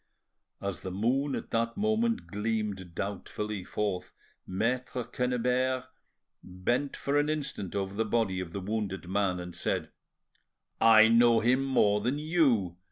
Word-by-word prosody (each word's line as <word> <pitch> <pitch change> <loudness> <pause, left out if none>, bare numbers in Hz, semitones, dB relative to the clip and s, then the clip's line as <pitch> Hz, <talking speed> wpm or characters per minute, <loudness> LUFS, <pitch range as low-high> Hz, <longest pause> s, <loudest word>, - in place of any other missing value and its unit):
As 100 -4 -4
the 95 - -5
moon 125 +9 0
at - - -6
that 115 0 0
moment 225 +2 +1
gleamed 105 -4 -3
doubtfully 105 0 -4
forth, 100 -2 -3 0.3
Maitre 125 +6 -1
Quennebert 125 +1 0 0.5
bent 120 +10 -2
for 145 +1 +1
an 145 +1 +1
instant 140 - -3
over 95 -1 -2
the 110 +3 0
body 110 -4 0
of 90 -2 -5
the 100 - -4
wounded 100 -2 -3
man, 95 -1 0
and 90 -1 -7
said: - - -2 0.9
"I 110 -1 +8
know 115 0 +5
him 125 +4 +3
more 105 -6 +3
than 125 +6 0
you. 140 - +2
110 Hz, 140 wpm, -29 LUFS, 95-130 Hz, 0.9 s, I